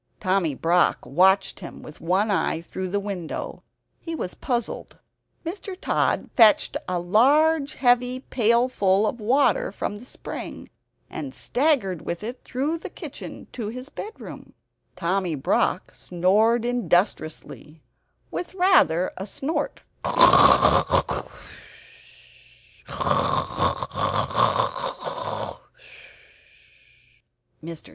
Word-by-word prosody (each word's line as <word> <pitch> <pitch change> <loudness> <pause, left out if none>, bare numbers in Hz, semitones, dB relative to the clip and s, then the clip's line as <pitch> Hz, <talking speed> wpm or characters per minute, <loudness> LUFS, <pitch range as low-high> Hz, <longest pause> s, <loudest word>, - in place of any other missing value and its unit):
Tommy 185 -6 0
Brock 170 +5 +1
watched 190 +2 +2
him 175 - -10
with 155 - -12
one 190 +6 +1
eye, 185 -4 0
through 185 +2 -6
the 205 +2 -1
window. 195 -5 -6 0.4
He 330 -1 -6
was 180 - -4
puzzled. 240 -4 -4 0.5
Mr. 370 +2 -6
Tod - - 0
fetched 225 -4 +5
a 180 - 0
large 280 - +3
heavy 250 0 +2
pailful 230 -5 +2
of 225 +3 -2
water 280 - +2
from 205 - -4
the 230 - -12
spring, - - -8 0.4
and 270 -3 -7
staggered 245 - 0
with 170 +3 -5
it 240 +4 -7
through 290 +6 -2
the - - -7
kitchen - - -9
into 230 -4 -7
his 255 +5 -7
bedroom. 430 +7 -10 0.4
Tommy 180 -1 -1
Brock 135 - 0
snored 210 +7 +1
industriously, 175 -8 -1 0.5
with 360 - -5
rather 355 - +3
a 195 - -5
snort. 280 +9 -3
215 Hz, 90 wpm, -24 LUFS, 185-260 Hz, 0.5 s, fetched